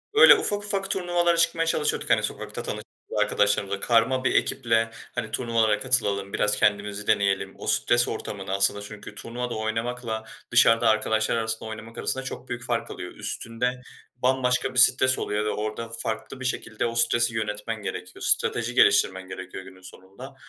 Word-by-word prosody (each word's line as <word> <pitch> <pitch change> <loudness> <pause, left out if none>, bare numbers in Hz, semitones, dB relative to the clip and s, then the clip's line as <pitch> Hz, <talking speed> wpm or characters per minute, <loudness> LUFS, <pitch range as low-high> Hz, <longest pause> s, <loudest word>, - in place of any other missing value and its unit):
Böyle, - - +10
ufak 210 - -1
ufak 195 -1 -2
turnuvalara 175 -2 +1
çıkmaya 165 0 +2
çalışıyorduk, 155 -2 0
hani, - - +3
sokakta - - -5
tanıştığımız - - -5
arkadaşlarımızla. 100 -1 +1
Karma 120 +4 +2
bir - - +1
ekiple, 115 -3 +1 0.2
hani, 110 - -3
"Turnuvalara 115 -3 +1
katılalım, 100 -6 0
biraz 105 0 +1
kendimizi 105 0 0
deneyelim." 100 -1 +1
O - - -8
stres 120 0 +2
ortamını 100 -3 -5
aslında 100 +1 +1
çünkü 105 0 -10
turnuvada 120 +3 -5
oynamakla 115 +1 -3 0.3
dışarıda 115 -1 +5
arkadaşlar 110 +1 +1
arasında 110 -1 -3
oynamak 110 +1 -9
arasında 135 - -2
çok 130 0 -7
büyük 120 0 -4
fark 120 -1 -2
alıyor. - - -7
Üstünde 125 +2 -3 0.3
bambaşka 125 0 +1
bir 130 - +2
stres 130 +1 +4
oluyor 105 +1 -1
ve 105 - 0
orada 110 +2 -3
farklı 110 +4 -4
bir 130 - -6
şekilde 110 -3 -2
o 115 0 -2
stresi 120 0 +2
yönetmen 105 0 -3
gerekiyor, - - -6
strateji 115 +1 +1
geliştirmen 95 -5 +4
gerekiyor 95 0 -8
günün 95 0 -14
sonunda. 95 +8 -12
115 Hz, 160 wpm, -25 LUFS, 105-125 Hz, 0.3 s, Böyle